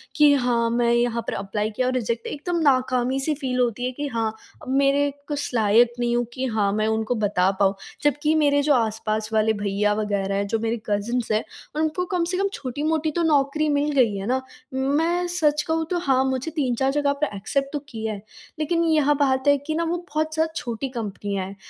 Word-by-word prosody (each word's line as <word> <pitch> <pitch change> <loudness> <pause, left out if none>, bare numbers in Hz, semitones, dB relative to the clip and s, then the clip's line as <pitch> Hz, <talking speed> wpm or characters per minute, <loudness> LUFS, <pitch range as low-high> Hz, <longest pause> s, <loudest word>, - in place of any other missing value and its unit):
कि 300 -4 +6
हाँ 245 -3 +1
मैं 235 0 +2
यहाँ 235 -1 +1
पर - - -2
एप्लाई 210 +2 -2
किया 255 +2 +1
और 255 - 0
रिजेक्ट 235 -2 -2
एकदम 340 +4 -2
नाकामी-सी 260 0 +2
फ़ील 260 -3 -2
होती 245 0 0
है 255 - -1
कि 290 +3 -4
हाँ, 225 -4 -1 0.3
अब - - -9
मेरे 280 +1 +3 0.2
कुछ 290 -1 -3
लायक 230 +2 +4
नहीं 240 0 +1
हूँ 240 0 +1
कि 265 +1 -2
हाँ 200 -2 +2
मैं 215 - +1
उनको 220 +2 0
बता 190 -2 +2
पाऊँ। 195 -1 +4 0.3
जबकि 295 +1 +2
मेरे 285 0 +3
जो 290 +1 +3
आस-पास 220 -2 0
वाले 220 0 +3
भैया 205 +1 +1
वग़ैरह 200 -2 -1
हैं, 200 0 -1
जो 225 +3 -1
मेरे 225 +1 -1
कजिन्स 225 +4 -1
हैं 215 +1 +2 0.4
उनको 315 +3 0
कम 350 - +2
से - - +1
कम 395 +1 +1
छोटी-मोटी 305 +3 -1
तो 340 +3 -1
नौकरी 300 0 +2
मिल 295 +1 0
गई 225 -5 +3
है 195 0 -4
ना। 260 +2 +1 0.3
मैं 315 +7 +1
सच 305 -4 +1
कहूँ 320 0 +1
तो 360 - 0
हाँ 265 -5 +2
मुझे 265 +4 -2
3-4 265 -3 0
जगह 285 0 +1
पर 275 - -1
एक्सेप्ट 275 +8 -2
तो 295 - -1
किया 220 -3 -4
है 200 - -8 0.4
लेकिन 335 +2 +1
यह 305 -3 +3
बात 270 -2 +1
है 285 0 +6
कि 315 - 0
न 330 - 0
वो 350 - 0 0.2
बहुत 310 +1 0
ज़्यादा 320 0 0
छोटी 245 -2 -3
कंपनियाँ 205 -5 -4
हैं। 195 +1 -9
255 Hz, 210 wpm, -23 LUFS, 220-295 Hz, 0.4 s, कि